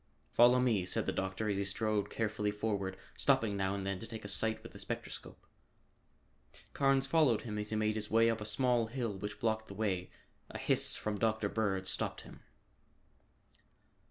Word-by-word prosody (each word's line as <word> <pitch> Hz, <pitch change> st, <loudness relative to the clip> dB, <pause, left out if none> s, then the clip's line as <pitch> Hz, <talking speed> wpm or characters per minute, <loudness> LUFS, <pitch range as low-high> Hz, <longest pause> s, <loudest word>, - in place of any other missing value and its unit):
"Follow 125 Hz, +1 st, +6 dB
me," 115 Hz, -7 st, +2 dB
said 90 Hz, -, 0 dB
the -, -, 0 dB
doctor 95 Hz, +3 st, -2 dB
as 100 Hz, -2 st, 0 dB
he 100 Hz, -, 0 dB
strode 105 Hz, +1 st, -1 dB
carefully 110 Hz, -2 st, -1 dB
forward, 105 Hz, -3 st, -2 dB, 0.2 s
stopping 130 Hz, -7 st, +2 dB
now 95 Hz, 0 st, 0 dB
and 100 Hz, -1 st, -4 dB
then 100 Hz, -1 st, -2 dB
to 115 Hz, -, -8 dB
take 110 Hz, -2 st, -8 dB
a -, -, -4 dB
sight 110 Hz, +2 st, +1 dB
with -, -, -10 dB
the -, -, -11 dB
spectroscope. -, -, -6 dB, 1.3 s
Carnes 135 Hz, -1 st, +3 dB
followed 135 Hz, -6 st, +3 dB
him 105 Hz, -3 st, -5 dB
as 105 Hz, 0 st, -3 dB
he 110 Hz, -, -1 dB
made 110 Hz, 0 st, +1 dB
his 105 Hz, -1 st, -4 dB
way 115 Hz, +1 st, +4 dB
up 115 Hz, -1 st, 0 dB
a -, -, -4 dB
small 120 Hz, 0 st, +2 dB
hill 115 Hz, -2 st, -3 dB
which 105 Hz, +2 st, -6 dB
blocked 110 Hz, -1 st, -1 dB
the -, -, -9 dB
way. 95 Hz, -4 st, -1 dB, 0.4 s
A -, -, -6 dB
hiss -, -, +5 dB
from 105 Hz, -1 st, -3 dB
Dr. 110 Hz, -2 st, +1 dB
Bird 95 Hz, -4 st, -1 dB
stopped -, -, -2 dB
him. -, -, -13 dB
110 Hz, 185 wpm, -33 LUFS, 100-115 Hz, 1.3 s, Follow